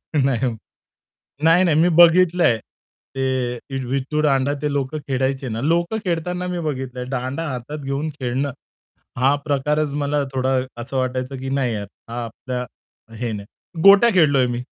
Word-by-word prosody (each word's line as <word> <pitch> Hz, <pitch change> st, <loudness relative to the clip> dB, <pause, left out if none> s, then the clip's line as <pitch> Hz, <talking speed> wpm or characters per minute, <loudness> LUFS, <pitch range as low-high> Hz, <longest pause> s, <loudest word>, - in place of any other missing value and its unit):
नाही. 145 Hz, -, +3 dB, 0.2 s
नाही 130 Hz, -, +3 dB, 0.9 s
नाही, 165 Hz, +3 st, +5 dB
नाही 165 Hz, -5 st, +3 dB
मी 175 Hz, -, +4 dB
बघितलंय, 175 Hz, -6 st, +6 dB, 0.6 s
ते 130 Hz, -2 st, 0 dB, 0.3 s
विट्टू 135 Hz, +4 st, -1 dB
दांडा 140 Hz, -1 st, +2 dB
ते 150 Hz, -1 st, -1 dB
लोक 140 Hz, +1 st, -2 dB
खेळायचे 135 Hz, -2 st, -2 dB
ना. 110 Hz, +1 st, -3 dB
लोक 170 Hz, +5 st, +1 dB
खेळताना 180 Hz, +1 st, -2 dB
मी 180 Hz, -1 st, -3 dB
बघितलंआहे. 130 Hz, -5 st, -4 dB
दांडा 130 Hz, +4 st, -3 dB
हातात 130 Hz, +3 st, -5 dB
घेऊन 140 Hz, +2 st, -3 dB
खेळणं, 130 Hz, +3 st, -1 dB, 0.7 s
हा 135 Hz, +3 st, +3 dB
प्रकारच 150 Hz, +1 st, 0 dB
मला 145 Hz, 0 st, 0 dB
थोडा 130 Hz, 0 st, 0 dB, 0.3 s
असं 130 Hz, +3 st, -5 dB
वाटायचं, 130 Hz, +1 st, -2 dB
की 135 Hz, +1 st, -5 dB
"नाही 135 Hz, -3 st, 0 dB
यार, 100 Hz, -2 st, -4 dB, 0.2 s
हा 120 Hz, +1 st, -4 dB
आपल्या 125 Hz, +2 st, -5 dB, 0.5 s
हे 120 Hz, -2 st, -2 dB
नाही." 105 Hz, -, -9 dB
गोट्या 200 Hz, +4 st, +8 dB
खेळलोय 145 Hz, -7 st, +4 dB
मी. 120 Hz, 0 st, -3 dB
135 Hz, 150 wpm, -21 LUFS, 130-155 Hz, 0.9 s, गोट्या